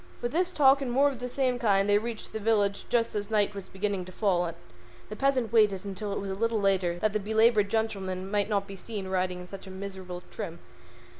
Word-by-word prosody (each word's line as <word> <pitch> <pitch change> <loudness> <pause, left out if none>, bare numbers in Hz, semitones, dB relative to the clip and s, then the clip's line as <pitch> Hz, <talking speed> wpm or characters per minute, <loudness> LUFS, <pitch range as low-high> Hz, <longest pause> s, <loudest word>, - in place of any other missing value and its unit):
With 240 - -2
this 360 +3 +1
talk 275 -4 +5
and 260 -3 -2
more 275 +3 +4
of 265 -4 -7
the 250 0 -4
same 255 -1 0
kind 200 -4 +3
they 205 0 +4
reached 230 0 -6
the 220 - -3
village 205 -2 +1
just 230 -1 +1
as 205 0 -3
night 210 -2 +2
was 200 -1 -8
beginning 195 -1 -2
to 185 - -10
fall, 185 -3 +1
but 165 - -6 0.5
the 215 - -5
peasant 255 -2 +1
waited 210 -4 +4
until 200 +1 -4
it - - -2
was 195 -1 -4
a - - -1
little 225 +2 0
later 190 -3 +1
that 210 +3 0
the 215 - +1
belaboured 220 0 +3
gentleman 195 -4 -2
might 205 0 +1
not 200 -2 +1
be 195 - -8
seen 200 0 -6
riding 185 -1 -1
in 180 - -9
such 195 +1 -9
a - - -8
miserable 190 -2 -7
trim. 170 0 -5
205 Hz, 235 wpm, -28 LUFS, 190-230 Hz, 0.5 s, talk